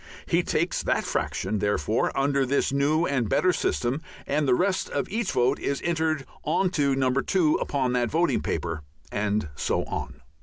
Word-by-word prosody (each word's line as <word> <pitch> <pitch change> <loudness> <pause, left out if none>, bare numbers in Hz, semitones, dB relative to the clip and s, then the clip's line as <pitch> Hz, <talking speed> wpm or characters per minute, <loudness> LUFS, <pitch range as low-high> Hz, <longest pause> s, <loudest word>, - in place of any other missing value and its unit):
He - - +2
takes - - 0
that - - 0
fraction, 110 - -2
therefore, 105 +2 +1
under 140 0 +2
this 135 +1 +1
new 150 +4 +2
and 130 -8 0
better 185 0 +3
system, 130 0 -1 0.2
and 145 +1 0
the 125 - +5
rest 185 +5 0
of - - -2
each 225 -1 -1
vote 125 +3 +2
is 140 - -1
entered 160 -4 0 0.2
on 175 +4 +1
to 140 -6 +2
No. 130 -1 +2
2 155 +4 +2
upon 130 -3 -1
that 120 -2 +1
voting 170 +6 +1
paper. 85 0 -2 0.3
And 105 -4 -1
so - - 0
on. - - -5
140 Hz, 175 wpm, -26 LUFS, 125-160 Hz, 0.3 s, the